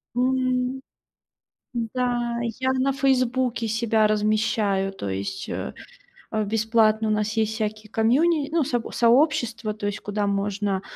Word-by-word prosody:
М. 255 +1 0 0.9
М-да, 240 0 -1 0.2
я 260 0 +1
на 260 +1 +1
"Фейсбуке" 255 -3 +1
себя 225 -1 +2
размещаю, 210 -2 +1
то 100 - -5
есть, 95 0 -4
э, - - -4 0.6
э, 215 -1 0
бесплатно. 220 +1 +2
У - - +1
нас 215 0 0
есть 220 -1 0
всякие 215 -1 -4
комьюни 285 +7 +2
ну, 330 -3 +2
соб 245 -4 -2
сообщества, 240 -3 +2
то 210 -1 -5
есть 205 0 -3
куда 205 0 -2
можно, 200 -1 -1
225 Hz, 130 wpm, -24 LUFS, 210-250 Hz, 0.9 s, себя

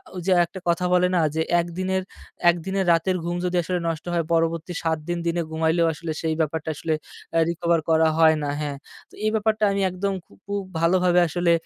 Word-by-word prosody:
ওই 180 - -4
যে, 190 - +1
একটা 190 +3 -10
কথা 170 +1 +1
বলে 180 0 +4
না - - +3 0.2
যে, 160 - +1 0.2
১ 170 - -6
দিনের, 190 0 0 0.5
১ 170 - +4
দিনের 195 0 -1
রাতের 180 +3 +1
ঘুম 175 0 -2
যদি 180 0 -1
আসলে 180 +2 -1
নষ্ট 165 -1 -3
হয়, 170 -1 +1
পরবর্তী 165 +1 0
৭ 160 -1 +1
দিন, 175 0 -1
দিনে 170 +1 0
ঘুমাইলেও 160 +1 +2
আসলে 160 +1 -5
সেই 160 -1 0
ব্যাপারটা 160 0 -2
আসলে 155 +2 -2 0.4
অ্যা 165 - +3
রিকভার 170 0 +1
করা 160 0 +4
হয় 160 -1 +6
না, 145 - -1
হ্যাঁ, 145 -2 -3 0.3
তো - - -27
এই - - +4
ব্যাপারটা 220 0 +1
আমি 195 0 0
একদম 190 +2 -2
খু - - -22
খুব 200 0 -2 0.2
ভালোভাবে 180 +1 +3
আসলে 175 +2 +1
170 Hz, 210 wpm, -24 LUFS, 160-185 Hz, 0.5 s, হয়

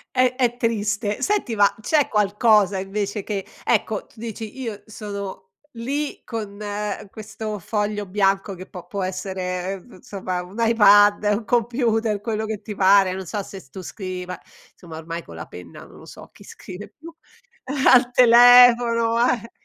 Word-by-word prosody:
È 255 0 +3
è 245 -2 0
triste. 210 -3 -1
Senti, 395 - 0
ma 205 -1 +4
c'è 295 +5 +2
qualcosa, 210 -1 +3
invece, 200 +1 -3
che, 200 -3 -4 0.2
ecco, 220 -2 0
tu 220 - -21
dici: 225 +1 -7
“Io 225 -4 -6
sono 200 -3 -8 0.2
lì 275 +6 -4
con 210 -3 -6 0.5
questo 215 0 -7
foglio 210 +2 -2
bianco”, 195 +1 0
che 185 +1 -10
può 180 -2 -10
può 200 -1 -5
essere, 185 0 -4
ev 195 +5 -9
insomma, 185 -6 -5
un 185 +3 -14
iPad, 205 -2 +5
un 220 0 -5
computer, 230 -3 0
quello 220 0 -3
che 215 -2 -5
ti 210 -2 -7
pare, 190 -1 +4
non 190 0 -6
so 205 +4 -4
se 195 0 -10
s 135 - -20
tu 190 - -8
scrivi, 185 0 -6
ma, 180 - -6 0.3
insomma, 165 -3 -11
ormai 165 +1 -6
con - - -13
la 80 - -8
penna 90 -2 -12
non - - -16
lo - - -14
so - - -13
chi - - -17
scrive 190 +3 -10
più, 330 +2 -12 0.7
al 250 -1 +6
telefono, 240 -1 +6
eh. 230 -1 -3
210 Hz, 165 wpm, -22 LUFS, 195-230 Hz, 0.7 s, al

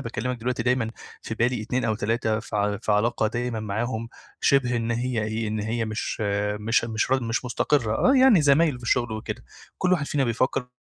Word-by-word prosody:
باكلِّمك 120 +2 -3
دلوقتي 120 0 -2
دايمًا 125 -2 +1 0.3
في 115 - -5
بالي 120 0 0
2 125 +3 -1
أو 110 - +1
3، 110 +1 0
ف 105 - -10
في 105 +1 0
علاقة 110 +1 +2
دايمًا 120 0 -2
معاهم 110 +2 -3 0.3
شِبه 125 -3 +3
إن 115 0 -2
هي 120 -1 -1
إيه، 110 0 -2
إن 110 0 -2
هي 115 +2 -1
مش 110 +1 -4 0.4
مش 115 +2 +2
مش 110 +2 -1
ر 135 -1 +2
مش 115 +2 -2
مستقرّة. 125 -2 +1
آه، 265 +1 +4
يعني 255 - +6
زمايل 145 0 +4
في - - -15
الشُغل 120 -1 +1
وكده، 110 +2 -5 0.3
كل 185 0 +1
واحد 150 -5 +1
فينا 140 -2 0
بيفكّر 125 +2 0
115 Hz, 195 wpm, -25 LUFS, 110-125 Hz, 0.4 s, يعني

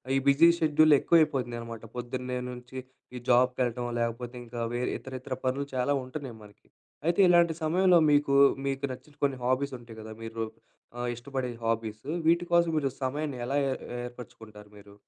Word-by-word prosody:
ఈ - - +4
busy 140 +4 +6
schedule 155 0 +5
ఎక్కువ - - +2
అయిపోతున్నాయనమాట. 120 -6 -2
పొద్దున్నే 125 +1 -4
నుంచి 125 +1 -9 0.5
జాబ్ 125 +1 +5
కెళ్ళడం 120 -1 -1
లేకపోతే, 120 +1 -3
ఇంకా 120 0 -7 0.2
వేరే 125 +1 -1
ఇతరత్రా 130 -1 -6
పనులు 135 +2 0
చాలా 130 +3 +1
ఉంటున్నాయి 130 -2 -7
మనకి. 105 -1 -18 0.4
అయితే 170 +2 +1
ఇలాంటి 170 -2 +5
సమయంలో 180 +3 +4
మీకు, 145 -1 +3 0.3
మీకు 135 0 -1
నచ్చిన 130 +4 -14
కొన్ని 140 -2 +1
హాబీస్ 130 +2 0
ఉంటాయి 115 -2 -12
కదా! 110 0 -8
మీరు 115 0 -4 0.5
ఆహ్, 120 0 -2
ఇష్టపడే 130 +1 -4 0.2
హాబీస్ 110 -1 -2 0.2
వీటికోసం 170 0 +3
మీరు 140 -3 +1
సమయాన్ని 145 +1 -2
ఎలా 135 +3 -2
ఏ - - 0 0.3
ఏర్పరుచుకుంటారు 110 -4 -11
మీరు? 100 0 -15
130 Hz, 150 wpm, -28 LUFS, 120-145 Hz, 0.5 s, busy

